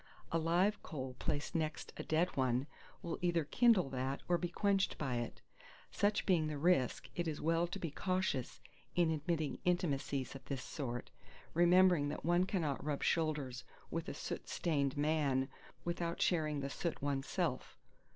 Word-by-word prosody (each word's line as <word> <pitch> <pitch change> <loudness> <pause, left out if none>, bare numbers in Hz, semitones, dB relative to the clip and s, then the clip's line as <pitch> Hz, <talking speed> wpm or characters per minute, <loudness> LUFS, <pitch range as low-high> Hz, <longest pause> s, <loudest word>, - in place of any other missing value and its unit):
A 165 - +2
live 180 +6 +2
coal 130 -4 -5
placed 145 +3 -2
next 160 -2 -2
a - - -5
dead 165 +3 +1
one 130 -1 +1 0.4
will 170 - -3
either 170 -2 +2
kindle 205 - +4
that 135 +1 -2
or 175 -1 +3
be 175 - -2
quenched 195 +2 +1
by 130 -5 -1
it. 120 - -5 0.5
Such 205 +1 +1
being 170 -5 +3
the 150 -1 -3
risk, 145 -5 +2
it 175 -1 -1
is 155 -2 -2
well 165 +2 +2
to 175 - -5
be 165 - -4
cautious 185 -7 -1 0.4
in 170 -2 +4
admitting 155 0 -1
intimacies 145 -6 0
of 135 - -9
this 135 -2 -4
sort, 125 -5 -4 0.4
remembering 175 -3 +5
that 150 - -5
one 175 +2 +4
cannot 160 -8 -1
rub 145 -1 -2
shoulders 150 -6 0 0.3
with - - -2
a - - -5
soot - - -5
stained 140 -4 0
man 145 -3 +2 0.4
without 170 0 -2
sharing 155 -4 +1
the 140 - -3
soot 170 +2 -2
oneself. 140 -1 -1
155 Hz, 160 wpm, -36 LUFS, 140-175 Hz, 0.5 s, remembering